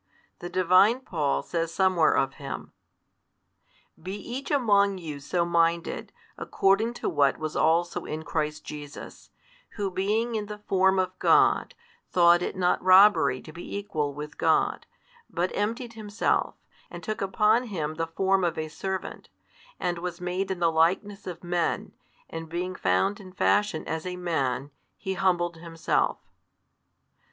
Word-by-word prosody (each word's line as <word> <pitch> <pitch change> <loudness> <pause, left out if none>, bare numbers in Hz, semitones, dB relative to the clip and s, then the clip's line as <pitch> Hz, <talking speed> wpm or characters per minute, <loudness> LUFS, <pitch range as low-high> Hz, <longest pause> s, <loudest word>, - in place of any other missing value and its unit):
The 175 - -6
divine 185 +7 +4
Paul 155 - -1
says 165 -1 -2
somewhere 185 -2 +3
of 135 0 +1
Him: 140 - -6 1.3
Be 185 +4 -5
each 245 +6 -6
among 200 -8 +3
you 155 -5 -6
so 170 +5 -1
1 170 - -5
minded, 170 0 +1 0.3
according 210 +5 +1
to - - -4
what 140 -1 +2
was 155 -1 -5
also 170 +2 +1
in 155 +1 -5
Christ 150 0 -3
Jesus, 145 -1 -9 0.5
Who 200 -3 -2
being 210 +6 0
in 210 -2 -2
the 210 0 -7
form 190 -2 +2
of 185 0 +1
God, - - +3 0.3
thought 175 -1 +5
it 180 - -3
not 180 -1 +1
robbery 185 -8 +5
to 155 - -11
be 175 +4 -6
equal 160 -8 -2
with 150 0 -8
God, - - +1 0.4
but 175 +2 -1
emptied 230 +3 -2
Himself, 215 -1 -1 0.3
and - - -9
took 215 -1 -4
upon 215 +5 +2
Him 160 -9 -3
the 165 +1 -3
form 190 +3 +1
of 170 - 0
a 155 0 -3
servant, 190 +4 -5 0.5
and 175 -1 -1
was 175 0 -5
made 180 +2 -2
in 190 - -2
the 170 -1 +2
likeness 185 +6 +1
of 175 -1 -7
men, 175 -1 -1 0.4
and 165 0 -7
being 180 +2 -3
found 95 - +1
in 185 -2 -12
fashion 205 -3 +1
as 160 +2 -3
a 180 - -4
Man, 145 -6 -2 0.3
He 190 - -3
humbled 175 -3 0
Himself. 165 -1 -1
180 Hz, 150 wpm, -27 LUFS, 165-200 Hz, 1.3 s, thought